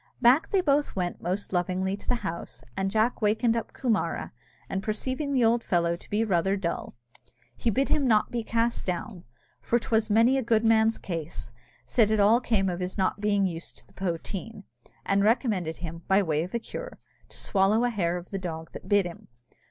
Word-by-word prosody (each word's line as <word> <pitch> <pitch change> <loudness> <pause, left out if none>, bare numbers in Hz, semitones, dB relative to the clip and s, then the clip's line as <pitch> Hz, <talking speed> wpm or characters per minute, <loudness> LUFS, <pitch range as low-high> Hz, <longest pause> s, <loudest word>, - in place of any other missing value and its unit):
Back 255 +6 +5
they 390 - +3
both 290 -3 +1
went 180 -2 -2
most 190 +3 -3
lovingly 185 +2 0
to 200 - -14
the 250 - +2
house, 165 -6 -5
and 195 0 0
Jack 220 +4 +1
wakened 220 +2 +2
up 230 - -3
Coomara; 235 -5 -1 0.4
and, 190 - -2
perceiving 260 +8 -2
the 255 -4 +3
old 230 +1 +3
fellow 170 -1 +1
to - - -15
be 210 +2 +1
rather 195 -1 +1
dull, 170 -9 -3 0.6
he 235 - 0
bid 270 +6 +1
him 280 -3 +2
not 215 -3 +4
to - - -26
be 235 -2 -2
cast 230 +1 0
down, 180 +1 -4 0.3
for 240 - +1
'twas 225 -1 0
many 230 +5 +4
a - - 0
good 225 -2 +2
man's 225 0 +4
case; 165 -8 -5 0.3
said 225 -4 +3
it 220 -1 +2
all 210 +4 +5
came 215 -6 +1
of 180 -1 -2
his 180 +2 -4
not 195 +1 0
being 205 -2 +2
used 170 -2 -4
to - - -12
the 190 - -24
poteen, 195 +4 -4 0.4
and 200 0 +2
recommended 205 - +1
him, 165 -1 -7
by 195 +1 +4
way 155 -3 0
of 175 +3 -5
cure, - - -7 0.3
to - - -9
swallow 200 +4 +2
a 245 - +2
hair 175 -5 0
of 175 0 -10
the 195 - -2
dog 160 -3 -6
that - - -10
bit 205 -2 +4
him. 175 -1 -8
205 Hz, 205 wpm, -27 LUFS, 180-230 Hz, 0.6 s, Back